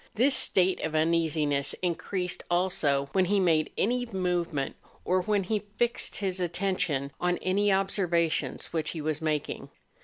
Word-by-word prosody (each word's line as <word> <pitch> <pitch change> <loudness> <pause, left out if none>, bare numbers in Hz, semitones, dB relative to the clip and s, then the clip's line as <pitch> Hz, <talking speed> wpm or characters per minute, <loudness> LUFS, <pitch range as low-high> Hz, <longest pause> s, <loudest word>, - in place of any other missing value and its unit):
This 260 +5 +3
state 185 0 +3
of 160 0 -2
uneasiness 155 -3 +1
increased 180 +1 -2
also 165 -6 +1
.when 190 +4 +3
he 200 +2 +2
made 165 -4 +2
any 245 +3 +1
movement, 175 -8 -1 0.3
or 185 +1 +2
when 205 +1 +1
he 210 +2 -2
fixed 240 0 0
his 190 -2 -2
attention 175 -6 -1
on 180 0 +1
any 200 +2 +2
observations 180 -6 0
which 160 -2 -1
he - - -3
was 155 +1 -2
making. 155 -2 -2
180 Hz, 145 wpm, -28 LUFS, 155-195 Hz, 0.3 s, This